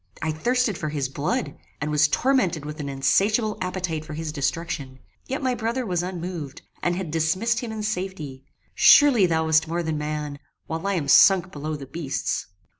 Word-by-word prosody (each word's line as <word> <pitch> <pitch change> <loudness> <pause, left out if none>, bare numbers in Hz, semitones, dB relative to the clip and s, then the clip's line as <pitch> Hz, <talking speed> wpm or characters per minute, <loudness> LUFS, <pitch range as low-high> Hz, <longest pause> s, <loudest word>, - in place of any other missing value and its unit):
I 160 - -1
thirsted 235 +5 0
for 155 - -2
his 145 -3 -2
blood, 145 +1 -2 0.2
and 150 +1 -2
was 150 0 +4
tormented 185 - +1
with 150 +1 -7
an 145 -1 -4
insatiable 210 - +1
appetite 180 -4 -2
for 155 -1 -8
his 160 0 -4
destruction; 140 -2 -3 0.3
yet 270 +2 -3
my 255 -1 +1
brother 240 +2 -2
was 180 -4 0
unmoved, 175 -5 -6 0.2
and 175 0 0
had 180 -4 -4
dismissed 185 +9 +1
him 235 -2 -5
in 215 -1 -5
safety. 180 -10 -4 0.3
Surely 260 -10 +6
thou 160 -1 +1
wast 160 0 +3
more 170 +2 -2
than 160 -2 -2
man, 150 -1 -4 0.3
while 165 +4 -4
I 200 - +1
am 155 -5 -2
sunk 185 +4 +6
below 155 +1 -4
the 140 -2 -7
beasts. 140 0 -3
165 Hz, 185 wpm, -24 LUFS, 150-195 Hz, 0.3 s, Surely